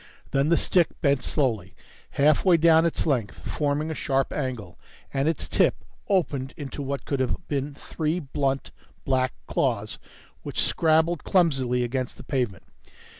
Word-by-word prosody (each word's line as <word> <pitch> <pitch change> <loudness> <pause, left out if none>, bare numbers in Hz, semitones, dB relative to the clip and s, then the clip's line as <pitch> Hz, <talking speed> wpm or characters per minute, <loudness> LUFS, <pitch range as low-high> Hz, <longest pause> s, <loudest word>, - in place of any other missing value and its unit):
Then 140 +2 +2
the 170 - +4
stick 175 -4 +3
bent 140 -3 +2
slowly 110 - -1 0.4
halfway 155 +5 +5
down 165 0 +5
its 165 - -1
length, 125 -10 -1
forming 150 +1 -1
a - - -1
sharp 135 -3 0
angle, 120 -11 -4 0.3
and 135 +1 +1
its 165 - -2
tip - - +3 0.3
opened 145 -8 0
into 145 0 -6
what 140 0 -4
could 140 - -1
have 130 +7 -2
been 140 0 -2
three 155 +3 -2
blunt, 135 -2 -2 0.3
black 130 -1 +1
claws - - -1 0.4
which - - -3
scrabbled 160 0 +2
clumsily 135 -9 +2
against 125 +1 -3
the - - -10
pavement. 125 -8 -2
140 Hz, 145 wpm, -25 LUFS, 130-160 Hz, 0.4 s, halfway